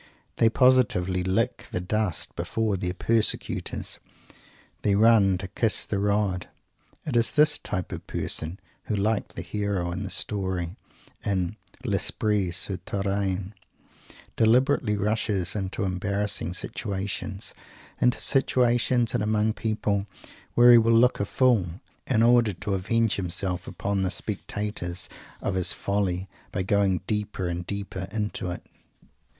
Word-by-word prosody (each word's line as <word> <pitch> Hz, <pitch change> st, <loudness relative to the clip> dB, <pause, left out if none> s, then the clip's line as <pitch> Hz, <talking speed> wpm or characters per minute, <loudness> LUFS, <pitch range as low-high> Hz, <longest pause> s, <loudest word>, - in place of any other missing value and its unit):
They 115 Hz, -, +5 dB
positively 110 Hz, -8 st, +3 dB
lick 110 Hz, +7 st, 0 dB
the -, -, -1 dB
dust 95 Hz, 0 st, -1 dB
before 100 Hz, +4 st, -1 dB
their 90 Hz, 0 st, -2 dB
persecutors. 110 Hz, +2 st, 0 dB, 0.8 s
They 100 Hz, -1 st, +2 dB
run 105 Hz, -3 st, +5 dB
to 95 Hz, +1 st, -5 dB
"kiss 105 Hz, +3 st, +1 dB
the 100 Hz, -, -1 dB
rod." 100 Hz, -3 st, 0 dB, 0.6 s
It 145 Hz, -, -3 dB
is 115 Hz, -1 st, +3 dB
this 150 Hz, 0 st, +4 dB
type 90 Hz, -1 st, -4 dB
of -, -, -7 dB
person 80 Hz, +4 st, -3 dB, 0.3 s
who, 105 Hz, -, -1 dB
like 105 Hz, +1 st, 0 dB
the 90 Hz, -, -5 dB
hero 100 Hz, -2 st, -2 dB
in 90 Hz, +3 st, -4 dB
that -, -, -5 dB
story 95 Hz, -4 st, -2 dB, 0.5 s
in 95 Hz, -1 st, -1 dB, 0.3 s
"L'Esprit 105 Hz, -4 st, 0 dB
Souterrain," 95 Hz, +1 st, -2 dB, 0.8 s
deliberately 115 Hz, -1 st, +3 dB
rushes 105 Hz, -3 st, 0 dB
into 100 Hz, +1 st, -2 dB
embarrassing 100 Hz, -1 st, -1 dB
situations; 100 Hz, +1 st, -3 dB, 0.5 s
into 125 Hz, -1 st, +4 dB
situations 120 Hz, -2 st, +2 dB
and 120 Hz, -, +1 dB
among 110 Hz, +1 st, +1 dB
people 105 Hz, -2 st, -1 dB, 0.5 s
where 120 Hz, +1 st, +8 dB
he 120 Hz, -, +9 dB
will 115 Hz, 0 st, +3 dB
look 120 Hz, +2 st, +4 dB
a 100 Hz, -, +1 dB
fool 105 Hz, -7 st, +2 dB, 0.3 s
in 115 Hz, -4 st, +3 dB
order 120 Hz, -3 st, +5 dB
to 100 Hz, +3 st, -3 dB
avenge 115 Hz, +4 st, +1 dB
himself 90 Hz, 0 st, -2 dB
upon 100 Hz, 0 st, -2 dB
the 95 Hz, -, +1 dB
spectators 100 Hz, -2 st, -4 dB, 0.3 s
of -, -, 0 dB
his 95 Hz, -1 st, +1 dB
"folly" 95 Hz, -2 st, -1 dB, 0.2 s
by 95 Hz, -, -1 dB
going 95 Hz, -1 st, +2 dB
deeper 105 Hz, -3 st, -2 dB
and 85 Hz, 0 st, -4 dB
deeper 100 Hz, -2 st, -4 dB
into 105 Hz, -4 st, -2 dB
it. 90 Hz, -, -6 dB
100 Hz, 130 wpm, -26 LUFS, 95-110 Hz, 0.8 s, he